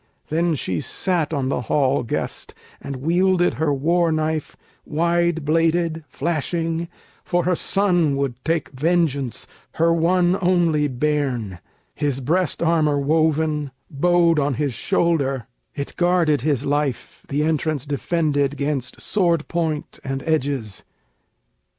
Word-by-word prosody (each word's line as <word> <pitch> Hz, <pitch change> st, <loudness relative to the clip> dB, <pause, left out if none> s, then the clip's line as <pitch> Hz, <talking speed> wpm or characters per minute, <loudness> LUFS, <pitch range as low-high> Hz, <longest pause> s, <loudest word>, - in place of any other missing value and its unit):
Then 165 Hz, +1 st, +1 dB
she 95 Hz, -, -2 dB
sat 175 Hz, -5 st, -1 dB
on 135 Hz, -4 st, -1 dB
the 130 Hz, -, -1 dB
hall 135 Hz, +2 st, +1 dB
guest 115 Hz, -, -4 dB, 0.3 s
And 140 Hz, -, -5 dB
wielded 175 Hz, +6 st, +2 dB
her 155 Hz, -2 st, +2 dB
war 165 Hz, +5 st, +2 dB
knife 155 Hz, -1 st, -2 dB, 0.3 s
wide 170 Hz, 0 st, 0 dB
bladed, 165 Hz, +1 st, +1 dB
flashing, 165 Hz, +3 st, -2 dB, 0.4 s
For 175 Hz, 0 st, 0 dB
her 180 Hz, -, +2 dB
son 175 Hz, -5 st, +1 dB
would 135 Hz, -3 st, -3 dB
take 165 Hz, +1 st, 0 dB
vengeance, 145 Hz, -3 st, 0 dB, 0.3 s
her 165 Hz, +1 st, +3 dB
one 175 Hz, +2 st, +2 dB
only 170 Hz, -5 st, +2 dB
bairn, 130 Hz, -, -1 dB, 0.3 s
His 145 Hz, -3 st, -1 dB
breast 170 Hz, +6 st, 0 dB
armor 160 Hz, -3 st, +2 dB
woven 155 Hz, 0 st, +1 dB, 0.2 s
bode 170 Hz, +2 st, +3 dB
on 140 Hz, -2 st, 0 dB
his 145 Hz, -1 st, -1 dB
shoulder; 140 Hz, -, 0 dB, 0.3 s
It 140 Hz, -1 st, -4 dB
guarded 175 Hz, -5 st, +2 dB
his 145 Hz, -2 st, 0 dB
life, 145 Hz, -2 st, -2 dB
the 145 Hz, +2 st, 0 dB
entrance 155 Hz, -2 st, 0 dB
defended 145 Hz, -1 st, 0 dB
'Gainst 140 Hz, -3 st, -2 dB
sword 170 Hz, -6 st, +1 dB
point 160 Hz, -3 st, -2 dB
and 135 Hz, 0 st, -4 dB
edges. 140 Hz, -9 st, -1 dB
155 Hz, 125 wpm, -22 LUFS, 140-170 Hz, 0.4 s, her